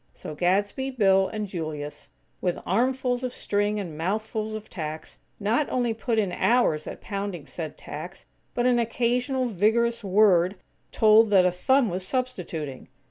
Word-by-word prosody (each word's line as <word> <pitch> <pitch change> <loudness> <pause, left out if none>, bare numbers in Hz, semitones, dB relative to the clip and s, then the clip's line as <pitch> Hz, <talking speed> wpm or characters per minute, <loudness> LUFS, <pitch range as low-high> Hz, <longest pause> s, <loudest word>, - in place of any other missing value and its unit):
So - - -7
Gadsby, 200 - 0
Bill 195 -6 +3
and 215 +2 -4
Julius, 155 -6 -6 0.3
with 180 -2 0
armfuls 250 +4 +1
of 255 - -2
string 205 -2 -1
and 175 -6 -5
mouthfuls 215 +5 -2
of 215 0 -7
tacks, 155 -2 -7 0.2
not 225 +8 +1
only 245 -3 0
put 225 +1 -2
in 200 -4 +1
hours 180 -8 +2
at - - -7
pounding 195 -6 -4
said 160 -1 -6
tacks, 175 +6 -8 0.3
but 245 - +1
an 245 -1 +4
occasional 245 +3 0
vigorous 230 +2 +1
word 190 -2 +4 0.4
told 220 0 +5
that 190 -3 +5
a 180 - +3
thumb 260 +8 +2
was 185 -1 -3
substituting! 180 - -4
205 Hz, 150 wpm, -26 LUFS, 180-235 Hz, 0.4 s, told